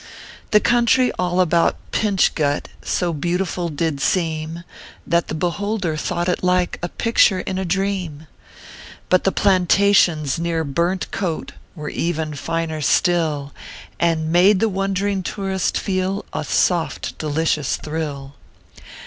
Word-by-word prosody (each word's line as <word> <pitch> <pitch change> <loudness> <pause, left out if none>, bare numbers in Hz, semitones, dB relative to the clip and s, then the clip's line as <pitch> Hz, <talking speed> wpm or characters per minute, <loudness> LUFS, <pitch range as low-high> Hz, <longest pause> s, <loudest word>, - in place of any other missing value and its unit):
The 210 - +5
country 240 +2 +3
all 180 0 0
about 170 -2 +3 0.2
Pinch 205 -4 +2
Gut 145 -2 -1
So 175 -2 -1
beautiful 175 +2 -2
did 150 -2 -2
seem, 160 0 -1 0.4
That 170 0 +1
the - - -4
beholder 180 +1 -1
thought 175 +3 -2
it 180 - -1
like 180 -1 +1
A 175 - -3
picture 220 -4 +3
in 190 0 -3
a 190 - -2
dream. 180 -4 -2 0.8
But 185 - +3
the 195 - +3
plantations 185 -6 +3
near 165 -1 -1
Burnt 170 +6 -1
Coat 175 -5 -3 0.2
"Were 150 -3 -5
even 160 -2 -2
finer 160 +1 -3
still, 155 -3 +1 0.5
And 160 -2 +1
made 185 +3 +5
the 225 - +2
wond 195 -1 -1
ring 200 -1 0
tourist 190 0 -2
feel 190 0 -2
A - - -2
soft, 175 -3 0
delicious 155 -1 0
thrill. 145 -3 -5
175 Hz, 130 wpm, -21 LUFS, 160-190 Hz, 0.8 s, The